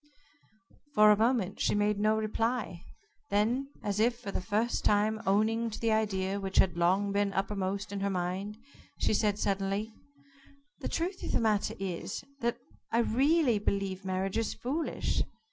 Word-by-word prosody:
For 210 0 +7
a - - +6
moment 220 -3 +1
she - - +2
made 205 0 +1
no 215 +1 +3
reply. 220 -3 -2 0.4
Then, 235 +7 +1
as 205 0 -1
if 235 +2 +3
for 200 - -6
the - - -2
first 220 +5 0
time 215 +1 +2
owning 220 +4 +2
to 215 - -7
the 230 -1 +1
idea 200 -3 0
which 195 -1 -4
had 180 -3 +4
long 185 +4 +2
been 200 0 +1
uppermost 195 +1 -2
in 200 - -3
her 200 0 0
mind, 190 +3 -3 0.4
she - - +1
said 210 -1 +2
suddenly: 200 +2 -1 0.9
"The - - -4
truth 365 +3 -2
of - - -4
the - - +3
matter 215 -3 +1
is, 185 -1 -4 0.2
that 235 -1 0 0.3
I 230 - +2
really 260 +1 +3
believe 195 -2 -2
marriage 190 +2 -1
is 225 - -2
foolish. 295 +7 -1
210 Hz, 160 wpm, -30 LUFS, 195-225 Hz, 0.9 s, For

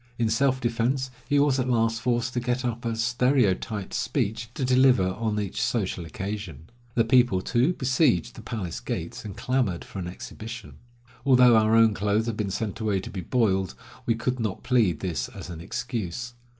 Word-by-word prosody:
In 115 -2 +1
self 130 +3 +2
defense 125 +2 0 0.2
he 145 - +3
was 140 -2 +3
at 130 0 0
last 115 -1 +1
forced 120 0 0
to 125 - 0
get 125 +1 -1
up 120 0 -3
a 115 -1 -1
stereotyped 115 -4 +1
speech 115 -1 -1
to 135 - -1
deliver 125 -6 +4
on 105 +2 -2
each 100 -3 -3
social 95 -6 -1
occasion. 90 - -6 0.2
The 115 - +4
people, 120 -5 +4
too, 125 - +1
besieged 130 - +2
the - - -10
palace 90 - -4
gates, - - -5
and 105 -1 -8
clamored 120 -7 0
for - - -8
an 90 - -4
exhibition. 115 +6 -8 0.5
Although 125 -3 +6
our 110 0 +4
own 115 -1 +6
clothes 105 +2 +1
had 115 -2 -2
been 105 -2 -2
sent 105 +2 -3
away 105 -3 0
to - - -7
be 95 -1 -4
boiled, 95 -3 +1 0.3
we 115 - +3
could 125 +2 -2
not 110 -4 -3
plead 115 -9 +2
this 85 -7 -2
as - - -9
an 80 -1 -7
excuse. 120 +3 -4
115 Hz, 185 wpm, -26 LUFS, 100-125 Hz, 0.5 s, Although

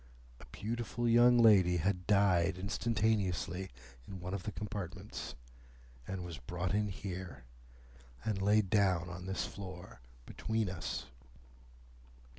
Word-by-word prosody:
A - - -13
beautiful 115 - -3
young 120 +1 +6
lady 100 -6 +6
had 90 +2 -1
died 95 -3 +4
instantaneously 95 -3 0 0.4
in 95 -1 -7
one 90 +2 -5
of 100 - -2
the 105 - -4
compartments, 100 -4 -6 0.7
and 95 -2 -4
was 85 -4 -7
brought 90 +2 -3
in 105 0 +2
here, 90 -8 -6 0.8
and 105 -3 -1
laid 105 -1 +3
down 95 -4 +3
on 90 +2 -7
this 95 - -1
floor 90 -5 -9 0.2
between 110 -4 -2
us." 90 - -4
95 Hz, 120 wpm, -34 LUFS, 90-105 Hz, 0.8 s, young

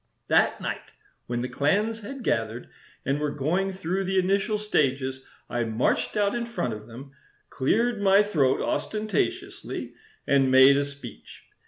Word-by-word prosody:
That - - +3
night, - - -5 0.3
when 120 0 -2
the - - -2
clans 205 +13 0
had 245 +5 -8
gathered 115 - -1 0.4
and 140 +2 0
were 150 0 0
going 160 +8 -1
through 190 +1 -2
the 190 +1 0
initial 195 +3 +1
stages 135 -9 0 0.2
I 120 -1 -1
marched 115 - 0
out 205 -1 +2
in 235 -1 -2
front 230 - -2
of 105 0 -9
them, 130 +4 -11 0.4
cleared 220 - +1
my 200 +1 +5
throat 150 -11 +1
ostentatiously, 215 -4 -3 0.3
and 135 -1 +3
made 130 +1 +7
a 140 0 +1
speech. 140 - -11
150 Hz, 150 wpm, -26 LUFS, 130-205 Hz, 0.4 s, made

